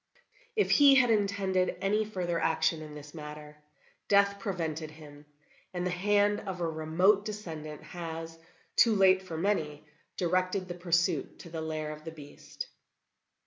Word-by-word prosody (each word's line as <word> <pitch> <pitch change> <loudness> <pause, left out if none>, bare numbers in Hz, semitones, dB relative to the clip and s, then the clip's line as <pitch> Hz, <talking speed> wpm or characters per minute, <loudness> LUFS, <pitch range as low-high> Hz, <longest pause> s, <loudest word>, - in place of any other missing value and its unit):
If 420 - +2
he 280 -2 +7
had 250 -3 +5
intended 195 -3 +1
any 210 +2 +1
further 180 -5 -2
action 160 0 +1
in 150 -1 -9
this 150 0 -10
matter, 150 -1 -9 0.5
death 200 0 +4
prevented 165 -6 -3
him; 150 -1 -14 0.5
and 180 0 -1
the 180 - 0
hand 205 +3 +2
of 190 -3 -6
a 170 - 0
remote 165 +6 +2
descendant 165 -8 -7
has, 165 -1 -7 0.4
too 230 -2 +5
late 190 -1 +5
for 175 -4 -7
many, 160 -6 -1 0.3
directed 185 +1 0
the 175 - -4
pursuit 170 -3 0
to 170 - -12
the 165 -1 -4
lair 155 -1 -3
of 155 0 -9
the 160 - -6
beast." 150 -3 -9
175 Hz, 150 wpm, -30 LUFS, 155-200 Hz, 0.5 s, he